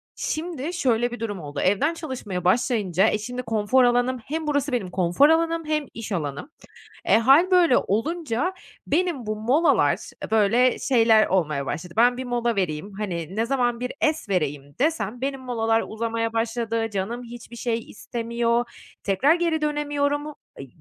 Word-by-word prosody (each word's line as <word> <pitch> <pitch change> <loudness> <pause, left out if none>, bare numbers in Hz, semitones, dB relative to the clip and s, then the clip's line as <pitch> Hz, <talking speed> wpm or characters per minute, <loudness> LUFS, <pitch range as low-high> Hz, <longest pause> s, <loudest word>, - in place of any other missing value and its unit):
şimdi, 320 -1 -4
şöyle 240 -8 +1
bir 240 - -7
durum 205 -5 -4
oldu, 145 -2 -6
evden 205 - +2
çalışmaya 255 - -5
başlayınca, 200 -2 +2
e, - - 0
şimdi 245 +4 -5
konfor 225 +3 +2
alanım 245 +1 +2
hem 315 +1 -4
burası 285 -1 0
benim 200 -7 -1
konfor 185 - +3
alanım 330 0 +1
hem 305 -1 -1
iş 225 -1 -7
alanım. 150 - -3 0.6
E, - - +5
hâl 275 +10 +5
böyle 350 -7 +5
olunca 305 - -1 0.3
benim 320 -6 0
bu 215 0 -2
molalar 250 - +3 0.3
e, - - -20
böyle 225 +4 +3
şeyler 225 -4 +4
olmaya 150 -7 0
başladı, 165 +5 -5
"Ben 245 +1 +5
bir 260 - -5
mola 240 -2 -1
vereyim." 180 +1 -2
hani, 180 -3 -4
ne 225 +1 +1
zaman 245 -2 0
bir 250 0 -3
es 310 -7 0
vereyim 145 -6 -2
desem, 250 -7 0
benim 270 0 -3
molalar 225 -3 0
uzamaya 230 +1 -2
başladı, 230 0 -1
canım 210 +5 -3
hiçbir 240 0 -11
şey 235 -1 -1
istemiyor, 235 +1 -2 0.4
tekrar 200 - +3
geri 335 -2 0
dönemiyorum, 290 -1 -1 0.3
eee, 135 - -7
235 Hz, 160 wpm, -24 LUFS, 210-285 Hz, 0.6 s, E